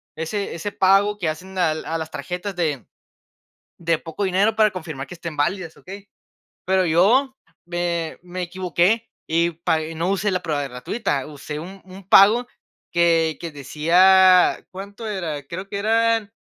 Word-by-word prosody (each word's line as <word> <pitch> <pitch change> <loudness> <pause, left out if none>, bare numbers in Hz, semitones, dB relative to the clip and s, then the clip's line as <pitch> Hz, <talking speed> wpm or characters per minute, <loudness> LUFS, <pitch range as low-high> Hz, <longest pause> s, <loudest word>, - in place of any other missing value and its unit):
ese 170 +4 -3
ese 205 +5 -4
pago 200 +2 +3
que 175 - -1
hacen 185 +5 -7
al 160 -3 0
a 165 - -2
las 160 0 -6
tarjetas 180 +2 -5
de 150 - -2 0.9
de 165 -1 0
poco 165 +6 -5
dinero 195 +4 +2
para 215 -1 +4
confirmar 160 -7 -6
que - - -10
estén 170 -2 -7
válidas, 165 +3 -2
¿okey? 195 +2 -11 0.6
Pero, 190 0 +2
yo 230 - +3 0.3
me 175 -2 -2
me 180 +1 -6
equivoqué, 185 +5 0 0.2
y 170 +2 +2
pag 160 -1 -1
y 165 - -7
no 170 +3 -1
usé 200 +1 0
la 180 0 -1
prueba 145 -4 -2
gratuita, 140 - -3
usé 150 0 -7
un 190 +4 -10
un 190 0 -13
pago 215 +6 +6 0.5
que 165 -2 +2
que 170 - -5
decía 180 +6 +4
¿Cuánto 200 +4 -8
era?, 170 -8 -4
creo 185 +6 -7
que 200 - -3
eran: 225 0 +1
180 Hz, 160 wpm, -22 LUFS, 160-195 Hz, 0.9 s, pago